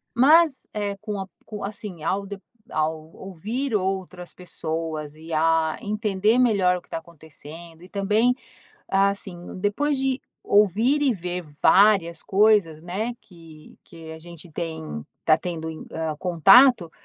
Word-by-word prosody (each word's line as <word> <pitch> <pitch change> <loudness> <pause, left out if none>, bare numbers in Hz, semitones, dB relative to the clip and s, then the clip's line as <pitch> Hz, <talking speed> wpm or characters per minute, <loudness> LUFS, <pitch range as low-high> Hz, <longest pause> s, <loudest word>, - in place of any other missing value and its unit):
Mas, 300 +3 +4
eh, 205 -1 -3
com 210 -1 -5
a 190 - -6 0.2
com 210 -1 -7
a - - -1
assim, 200 -5 -8
ao 195 +4 -1 0.5
ao 155 0 -2
ouvir 215 - -4
outras 185 -2 -3
pessoas 160 -4 -5
e 160 +1 -12
a 160 0 +2
entender 210 +1 0
melhor 200 -7 +3
o 180 - -9
que - - -27
está - - -3
acontecendo 160 0 -12
e 180 - -12
também 210 +5 +1 0.5
assim, 195 -1 0 0.2
depois 270 +9 0
de 265 0 0 0.2
ouvir 215 - +3
e 270 -4 +3
ver 180 -2 -4 0.2
várias 190 -5 +4
coisas, 200 -6 +3
né? 195 +8 -3
Que 165 -7 -16
que 160 -1 -11
a 160 - -10
gente 170 +1 -11
tem 160 - -5 0.2
tá 155 - +6
tendo, 165 -1 -5 0.2
ah, 160 -1 -3
contato 190 - +5
185 Hz, 140 wpm, -24 LUFS, 165-210 Hz, 0.5 s, tá